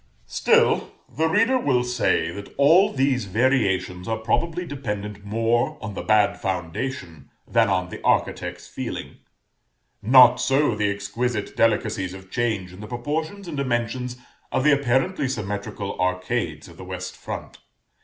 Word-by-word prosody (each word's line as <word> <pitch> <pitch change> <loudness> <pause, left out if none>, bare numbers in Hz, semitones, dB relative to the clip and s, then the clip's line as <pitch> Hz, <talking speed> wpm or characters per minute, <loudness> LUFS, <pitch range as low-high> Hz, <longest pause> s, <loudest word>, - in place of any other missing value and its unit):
Still, - - +2
the 160 +2 0
reader 230 +9 +3
will 125 - +2
say 120 -9 +1
that 100 +3 -9
all 165 +8 +5
these 130 -4 +1
variations 95 -5 +1
are 110 - -1
probably 165 +10 -1
dependent 105 -8 -5
more 115 +3 0
on 110 -2 -6
the - - -5
bad 105 -1 +2
foundation 85 - -4 0.2
than 115 -2 +3
on 90 -2 0
the - - -8
architect's - - 0
feeling. - - -6 0.8
Not 125 +2 +7
so 135 -1 +2
the 105 -1 0
exquisite 105 +3 -3
delicacies 105 -4 +1
of 95 0 -13
change 110 -7 -1
in 90 - -12
the 105 - -8
proportions 155 - -4
and 165 - -5
dimensions 125 -1 -2 0.3
of 130 - +1
the 150 - +5
apparently 140 +4 +1
symmetrical 105 -4 -4
arcades 90 -3 -1
of 85 -1 -15
the - - -9
west 90 0 -6
front. - - -7
115 Hz, 145 wpm, -24 LUFS, 100-130 Hz, 0.8 s, Not